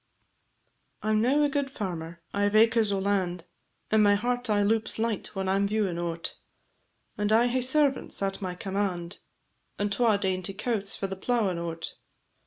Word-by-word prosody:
"_ - - -3
I - - +2
'm 215 0 +3
now 275 +6 +3
a - - +4
guid 285 -1 -1
farmer, 170 -8 -5
I 205 0 +2
've 205 - -4
acres 225 -1 +4
o' 200 - +1
land, 190 -3 -1 0.5
And 220 0 +5
my 205 -1 +5
heart 245 +3 -1
aye 205 -1 +3
loups 220 +1 0
light 225 -1 -1
when 190 0 -2
I 190 - +2
'm 200 +1 +2
viewing 200 -5 0
o't, 170 -1 -4 0.8
And 210 0 +1
I 225 +2 +5
hae 250 +1 +1
servants 270 +2 +2
at 195 0 -2
my 185 -2 -3
command, 190 -2 -3 0.6
And 205 0 -1
twa 220 0 +3
dainty 190 -1 -1
cowts 210 -2 -1
for - - -3
the 190 0 -4
plowin' 195 -3 0
o't. 165 -1 -5
205 Hz, 185 wpm, -27 LUFS, 190-225 Hz, 0.8 s, And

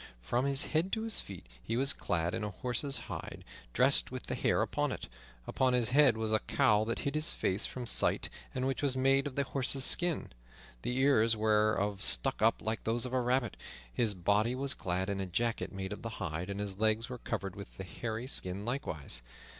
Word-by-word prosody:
From 120 - 0
his 140 0 +1
head 165 +4 0
to 220 - -1
his 225 -1 +3
feet 95 -8 -9 0.2
he 115 - -3
was 135 +2 +4
clad 85 0 -1
in 115 -1 -2
a 105 - -2
horse's 125 +5 -2
hide, - - -7 0.3
dressed - - +3
with - - -6
the - - -4
hair - - +1
upon - - -1
it. - - -6 0.4
Upon 130 -1 +1
his 120 -2 +2
head 135 -4 +5
was 110 -1 -2
a 110 - +4
cowl 105 0 +2
that 115 +1 -2
hid 140 - -1
his 155 +2 0
face 95 +3 0
from 125 -1 -6
sight, - - +4 0.3
and 130 0 -1
which 135 0 -1
was 135 -3 +1
made 135 +2 +3
of 135 - -7
the 140 - +1
horse's 135 0 +2
skin, 175 -3 +3 0.5
the 125 - -2
ears 115 -5 +3
whereof 105 -2 +1
stuck 135 +4 +3
up 110 +1 +3
like 110 +1 -2
those 115 +2 0
of 125 - -6
a 130 - +2
rabbit. 125 -1 0 0.4
His 110 - 0
body 105 +7 +1
was 135 +1 -1
clad 90 +1 -2
in 100 -1 -2
a 95 - -3
jacket 115 +6 -1
made 95 0 -5
of - - -9
the 115 - -5
hide, 90 -1 -4
and 100 0 -4
his 100 -1 -5
legs 110 +1 +2
were 125 -2 -7
covered 95 -4 -4
with 100 - -10
the 95 - -5
hairy 110 +5 -5
skin 100 -5 -2
likewise. 80 - -3
115 Hz, 215 wpm, -32 LUFS, 100-130 Hz, 0.5 s, head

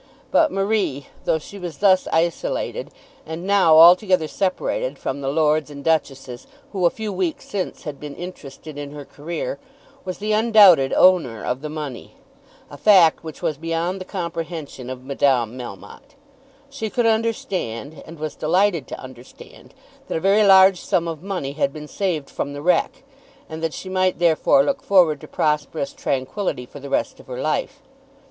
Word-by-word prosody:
But 315 -2 +4
Marie, 195 -9 -1 0.2
though - - +2
she 200 +6 -11
was 175 -5 -7
thus 190 -2 +3
isolated, 480 - -1 0.3
and 160 +3 -7
now 190 -5 +5
altogether 180 0 +6
separated 200 - -2
from 140 +1 -4
the 135 - -4
lords 150 0 +1
and 140 -1 -10
duchesses 135 -6 -2 0.2
who 185 -4 +2
a - - +3
few 215 +2 -5
weeks 180 -3 -3
since 195 -3 -4
had 145 -3 -7
been 150 -1 -8
interested 155 -4 -9
in 145 0 -7
her 145 -1 -8
career, 170 - -5 0.4
was 185 -1 -5
the 210 +1 -3
undoubted 210 -10 +6
owner 165 -12 +3
of 125 +2 -2
the 150 - -5
money, 150 -5 -7 0.6
a 145 - -9
fact 180 -2 +5
which 160 -2 -9
was 150 -2 -1
beyond 165 +3 -2
the - - -6
comprehension 165 - -6
of 130 0 -7
Madame 130 -4 +1
Melmotte. 130 - -10 0.5
She 275 -6 -5
could 240 +2 0
understand, 190 - -2
and 165 +1 -12
was 155 0 -4
delighted 175 -1 +1
to - - -7
understand, 130 -1 -13 0.4
that - - -2
a - - -1
very 195 +4 +3
large 190 -2 +7
sum 170 -1 0
of 160 -2 -5
money 185 -8 -4
had 140 -1 -1
been 150 +1 -9
saved 165 -6 -2
from 140 - -5
the 145 0 -7
wreck, 180 +9 +1 0.4
and 160 0 -7
that 165 -1 -2
she - - -8
might 185 0 +1
therefore 175 - +3
look 275 -1 -1
forward 170 -7 +3
to - - -10
prosperous 150 - -1
tranquillity 140 - -3
for 145 - -12
the 140 0 -9
rest - - -1
of - - -16
her 125 -1 -6
life. 155 - -2
165 Hz, 170 wpm, -21 LUFS, 145-195 Hz, 0.6 s, large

